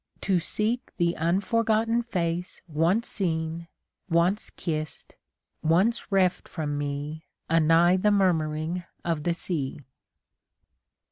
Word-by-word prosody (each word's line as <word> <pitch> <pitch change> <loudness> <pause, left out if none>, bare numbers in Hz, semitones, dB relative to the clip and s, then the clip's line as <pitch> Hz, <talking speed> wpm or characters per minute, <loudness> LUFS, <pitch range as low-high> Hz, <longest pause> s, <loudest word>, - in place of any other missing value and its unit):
To 190 -3 +2
seek 220 +8 -2
the 170 0 +2
unforgotten 220 +6 +1
face 180 -6 -2
Once 170 +8 +1
seen, 165 -3 -2 0.4
once 175 +5 +2
kissed, 155 -2 -5 0.5
once 190 +9 +2
reft 185 -2 +2
from 150 -3 -3
me 145 +2 -4 0.2
Anigh 165 +2 +5
the 210 +3 +3
murmuring 170 -3 +1 0.2
of 165 -3 0
the 170 +2 0
sea. 150 -6 -3
170 Hz, 105 wpm, -27 LUFS, 160-195 Hz, 0.5 s, Anigh